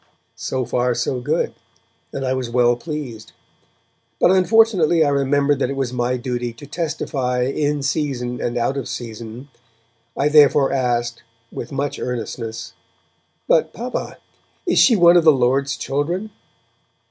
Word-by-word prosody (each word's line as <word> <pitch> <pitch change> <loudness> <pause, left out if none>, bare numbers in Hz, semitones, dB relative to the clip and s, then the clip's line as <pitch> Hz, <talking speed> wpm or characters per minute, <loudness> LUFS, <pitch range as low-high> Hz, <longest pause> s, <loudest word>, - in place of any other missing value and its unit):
So 130 -1 -3
far 125 +1 0
so 125 +2 -1
good, 125 - -1 0.6
and 135 - -4
I 130 - 0
was 130 -2 -3
well 120 0 +3
pleased. 120 -6 -7 0.9
But - - +5
unfortunately 185 -4 +4
I - - +2
remembered 140 0 +1
that - - 0
it 140 - -3
was 135 -2 -2
my 125 +1 0
duty 120 -1 -3
to 120 +5 -12
testify 135 -5 -2
'in 145 +2 -1
season 135 -4 -2
and 120 0 -2
out 120 +4 0
of 135 - -4
season'. 115 +3 -7 0.7
I 140 - +2
therefore 145 -2 +5
asked, 120 -3 -1 0.3
with 120 - -7
much 140 +1 -3
earnestness, 115 -2 -5 0.7
'But, 160 -1 +2
Papa, 245 +2 -5 0.5
is 355 - +2
she 240 - +6
one 175 -2 +6
of 170 - +4
the 160 - +7
Lord's 135 +1 +1
children?' 175 +10 -2
135 Hz, 145 wpm, -20 LUFS, 120-150 Hz, 0.9 s, the